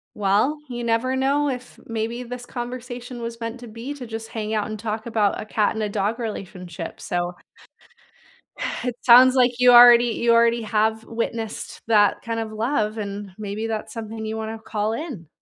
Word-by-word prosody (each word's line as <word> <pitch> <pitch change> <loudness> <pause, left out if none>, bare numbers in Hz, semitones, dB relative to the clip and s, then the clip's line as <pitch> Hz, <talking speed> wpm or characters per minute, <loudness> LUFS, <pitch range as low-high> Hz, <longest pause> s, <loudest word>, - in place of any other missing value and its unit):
Well, 210 +9 +2
you 240 -1 -5
never 235 +3 +1
know 280 +2 +1
if 250 -1 -6
maybe 230 +2 -3
this 245 0 -7
conversation 245 0 -6
was 230 0 -5
meant 230 +1 -5
to 240 - -10
be 230 +6 -6
to 250 -4 -8
just 225 0 -6
hang 215 -1 -4
out 210 -1 0
and 215 -1 -6
talk 220 0 -4
about 215 -4 +1
a - - -5
cat 215 -1 +1
and 220 - -2
a 210 - -1
dog 205 +3 -1
relationship, 180 -7 -6
so 175 0 -2 1.5
It 245 -1 -2
sounds 255 +2 +8
like 250 -1 +3
you 250 0 +7
already 240 0 +9
you 235 0 +2
already 235 0 +4
have 220 +1 +1
witnessed 230 -1 -4
that 205 -3 +4
kind 230 -1 -3
of 220 -1 -4
love 220 -1 -1
and 200 -2 -5
maybe 215 +1 -4
that's 220 -1 -4
something 220 -1 -6
you 220 0 -3
want 220 0 -4
to 220 - -12
call 215 0 -2
in. 230 - -6
225 Hz, 185 wpm, -23 LUFS, 215-240 Hz, 1.5 s, already